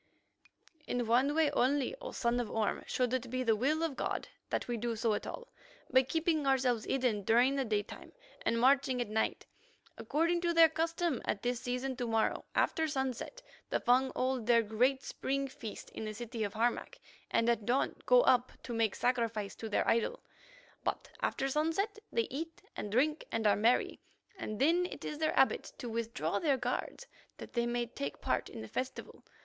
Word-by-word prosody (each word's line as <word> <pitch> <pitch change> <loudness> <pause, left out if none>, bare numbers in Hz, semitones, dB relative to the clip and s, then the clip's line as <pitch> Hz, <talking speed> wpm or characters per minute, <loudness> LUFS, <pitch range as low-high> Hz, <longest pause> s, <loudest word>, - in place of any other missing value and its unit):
"In 245 -1 -1
one 255 +6 +3
way 315 -2 +3
only, 275 - +1
O - - -5
son 235 0 0
of 240 - -2
Orme, 220 -2 -1
should 250 -1 0
it 255 -1 -1
be 255 +1 -1
the 225 -3 +3
will 295 +8 +1
of 320 -5 -1
God - - -2 0.2
that - - -1
we 240 - -1
do 230 0 -2
so 220 0 +1
at - - -3
all; - - -7 0.4
by 260 0 +7
keeping 315 +2 0
ourselves 255 -4 +2
hidden 250 -6 +1
during 240 +7 +4
the 275 - +1
daytime 210 -4 -3 0.3
and 230 - +1
marching 265 0 +4
at 240 - -2
night. 220 +1 -1 0.5
According 335 +3 +1
to 340 -1 0
their 330 -1 +8
custom 330 -3 -1
at 200 - -2
this 245 -1 0
season, 255 +1 -2
to 245 -2 -2
morrow, 225 -1 +1
after 320 0 +2
sunset, 270 - -3 0.3
the - - +1
Fung 255 +2 +3
hold 255 -3 -1
their 235 -1 +5
great 250 +5 +1
spring 275 +1 -2
feast 225 -5 -8
in - - -6
the 215 0 -5
city 230 0 -4
of 205 0 -3
Harmac, 235 +2 0 0.3
and 230 - +2
at 230 -3 +1
dawn 250 +3 +1
go - - +7
up 250 - +4
to 240 - -5
make 225 -3 +1
sacrifice 230 -5 0
to 225 - -7
their 205 - +1
idol. 230 - +1 0.6
But - - -3
after 270 - 0
sunset 325 +9 0
they 230 - +1
eat 325 +5 -5
and 205 - -5
drink 300 +7 +2
and 225 -1 -1
are 205 - +5
merry, 230 +4 +2 0.4
and 215 - -5
then 340 +6 +3
it - - -8
is 300 - -4
their 315 -1 +1
habit 265 - +2
to 245 - -6
withdraw 230 +1 -2
their 290 -5 +2
guards, 250 - -3 0.3
that - - -10
they 235 -1 +1
may 240 0 0
take 145 -11 -5
part - - -1
in - - -8
the 110 - -7
festival. 255 - -5
250 Hz, 190 wpm, -33 LUFS, 230-280 Hz, 0.6 s, their